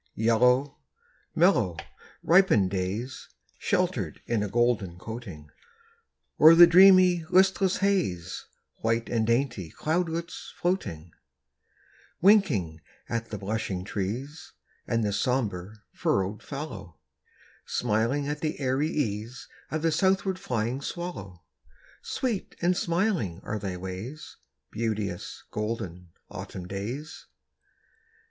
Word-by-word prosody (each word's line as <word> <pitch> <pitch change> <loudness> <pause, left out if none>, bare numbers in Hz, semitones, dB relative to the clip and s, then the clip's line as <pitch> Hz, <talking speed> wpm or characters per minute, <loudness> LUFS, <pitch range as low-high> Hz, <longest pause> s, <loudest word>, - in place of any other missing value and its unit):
Yellow, 125 +5 +2 0.6
mellow, 125 - +3 0.5
ripened 165 - +4
days, 100 +7 -4 0.3
Sheltered - - -1
in 115 -3 0
a 105 - -2
golden 115 -6 +1
coating; 95 -8 -8 0.9
O'er 160 +2 +9
the 175 +1 +11
dreamy, 180 -1 +7
listless 190 0 +3
haze, 170 - -1 0.3
White 115 +1 -1
and 110 -2 0
dainty 115 - 0
cloudlets 165 - -3
floating; 90 - -2 1.1
Winking 135 - +3 0.3
at 115 -1 -3
the 105 - -5
blushing 100 -2 -3
trees, 115 +10 -5 0.3
And 115 -1 +1
the 105 -1 0
sombre, 105 -3 -2
furrowed 100 +2 -1
fallow; 100 - -7 0.7
Smiling 120 +5 0
at 150 0 -3
the 155 -2 -2
airy 135 +3 0
ease 115 -4 -3 0.2
Of 155 0 -3
the 165 - +3
southward 190 +2 +1
flying 125 0 -2
swallow. 100 - -6 0.6
Sweet 235 -7 -3
and 175 +1 +2
smiling 170 - 0
are 105 - -3
thy 95 -2 -4
ways, 95 +11 -7 0.3
Beauteous, 105 -5 -3
golden, 95 -5 -4 0.2
Autumn 90 -1 -8
days! 115 - -6
115 Hz, 105 wpm, -27 LUFS, 100-160 Hz, 1.1 s, the